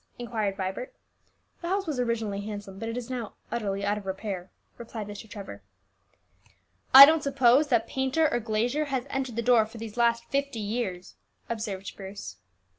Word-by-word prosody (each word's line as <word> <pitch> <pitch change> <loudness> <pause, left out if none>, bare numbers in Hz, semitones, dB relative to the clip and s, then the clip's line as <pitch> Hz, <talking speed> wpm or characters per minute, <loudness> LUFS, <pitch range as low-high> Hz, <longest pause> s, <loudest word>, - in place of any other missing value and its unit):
inquired 220 -5 -2
Vibert. 190 +6 -4 0.7
"The 340 - -4
house 390 +1 0
was 300 -6 -3
originally 225 -4 -1
handsome, 205 -2 -7
but 225 - -4
it 230 - -4
is 245 -2 -5
now 245 -5 -5 0.2
utterly 200 -4 -2
out 205 +1 0
of 195 - -12
repair," 190 -1 -4 0.3
replied 230 -2 -6
Mr. 205 +1 -9
Trevor. 200 -2 -8 1.3
"I 270 +1 +13
don't 315 +2 +3
suppose 275 0 +4
that 235 -5 +2
painter 265 +4 +1
or 240 - +2
glazier 240 +6 0
has 265 -3 -2
entered 265 -4 -2
the 235 - -1
door 230 -2 +4
for 225 - -12
these 225 0 -8
last 235 0 +2
fifty 280 -2 -2
years," 205 -4 -4 0.3
observed 210 -4 -4
Bruce. 195 0 -8
230 Hz, 170 wpm, -27 LUFS, 205-255 Hz, 1.3 s, I